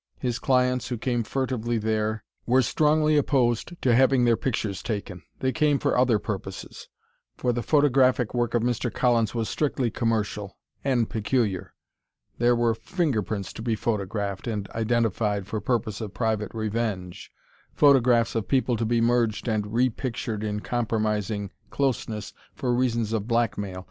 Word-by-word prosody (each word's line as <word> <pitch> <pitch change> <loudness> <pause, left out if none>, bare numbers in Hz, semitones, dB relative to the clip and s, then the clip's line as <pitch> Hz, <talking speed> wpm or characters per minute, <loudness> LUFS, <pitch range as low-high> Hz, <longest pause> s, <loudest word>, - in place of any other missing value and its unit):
His 125 -2 -2
clients, 125 -1 +2
who 120 0 -3
came 120 +1 -1
furtively 120 -1 -1
there, 110 0 -1 0.2
were 130 +2 +4
strongly 155 +4 +3
opposed 135 +3 +1
to 125 - +4
having 130 0 +4
their 120 -1 +4
pictures 105 -6 -2
taken 100 -5 -4 0.2
they 130 - +1
came 150 -1 +2
for - - 0
other 125 -3 +4
purposes. 95 -3 -6 0.5
For 125 - 0
the 120 - -1
photographic 130 -4 +3
work 120 -1 0
of 115 - +2
Mr. 120 0 0
Collins 120 -3 +1
was 115 -2 -1
strictly 135 -5 -1
commercial 105 -3 -2 0.3
and 125 -5 +2
peculiar. 110 -3 -1 0.6
There 120 +1 +4
were 120 -1 +2
fingerprints 110 - -2
to - - -8
be 115 -1 0
photographed 100 -2 -2
and 105 -4 -3
identified 110 -3 0
for 105 +1 -4
purpose 115 -2 -1
of 105 -3 -6
private 110 -3 -1
revenge, 110 -5 -3 0.4
photographs 125 -5 +4
of 115 -2 -2
people 130 -2 +2
to 115 - -1
be 115 +1 +1
merged 115 -1 +1
and 110 -2 0
repictured 115 0 -1
in 105 -1 -2
compromising 105 -4 -1 0.2
closeness 115 -6 -2 0.2
for 125 -2 -1
reasons 115 -3 0
of 110 -1 -1
blackmail. 105 -5 -1
115 Hz, 150 wpm, -26 LUFS, 105-125 Hz, 0.6 s, were